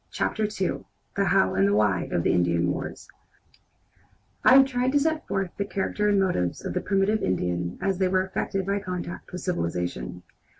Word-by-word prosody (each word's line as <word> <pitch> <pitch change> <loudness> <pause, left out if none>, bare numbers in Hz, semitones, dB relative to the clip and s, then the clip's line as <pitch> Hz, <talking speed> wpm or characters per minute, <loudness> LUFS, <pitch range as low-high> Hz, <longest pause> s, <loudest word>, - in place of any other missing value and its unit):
CHAPTER 220 - -1
II 200 -3 -2 0.3
THE - - +1
HOW 95 - +3
AND 95 +1 +3
THE 100 - +2
WHY 105 -4 +1
OF 85 - 0
INDIAN 85 0 +2
WARS - - -6 1.4
I 255 - +7
have 270 - +8
tried 255 0 0
to 290 - +5
set 315 +2 -1
forth 195 -2 -1
the 200 - 0
character 210 +1 -1
and 200 -1 +3
motives 135 - 0
of - - -3
the - - -1
primitive 200 +2 +1
Indian 90 -1 -1
as 195 -2 -1
they 190 - +3
were 185 0 +1
affected 190 0 -2
by 200 +1 0
contact 180 -3 -6
with 180 - -6
civilization. 85 - -3
185 Hz, 180 wpm, -26 LUFS, -, 1.4 s, have